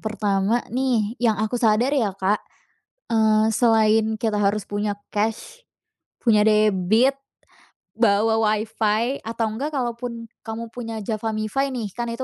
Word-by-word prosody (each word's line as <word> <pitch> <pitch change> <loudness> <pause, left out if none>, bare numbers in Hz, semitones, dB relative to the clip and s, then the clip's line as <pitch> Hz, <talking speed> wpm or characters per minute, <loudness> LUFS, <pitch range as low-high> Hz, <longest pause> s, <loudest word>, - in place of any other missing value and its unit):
Pertama 215 +1 0
nih, 245 -5 0
yang 225 -3 +2
aku 220 +4 -2
sadar 230 +4 +3
ya, 220 -9 0
Kak, 195 +2 0 0.7
eee, 220 0 +3
selain 220 -1 +3
kita 215 -2 -1
harus 205 +1 +1
punya 205 0 -3 0.2
cash, 225 - -2 0.6
punya 215 -4 +3
debit, 215 +4 +3 0.8
bawa 220 0 +2
Wi-Fi, 220 +3 0
atau 230 0 -1
nggak 285 +7 -4
kalaupun 235 -2 -4
kamu 225 0 -7
punya 225 -2 -6
JavaMifi 215 +4 -2
nih, 240 -7 -4
kan 240 +4 -4
itu 235 +2 -4
220 Hz, 130 wpm, -23 LUFS, 210-235 Hz, 0.8 s, sadar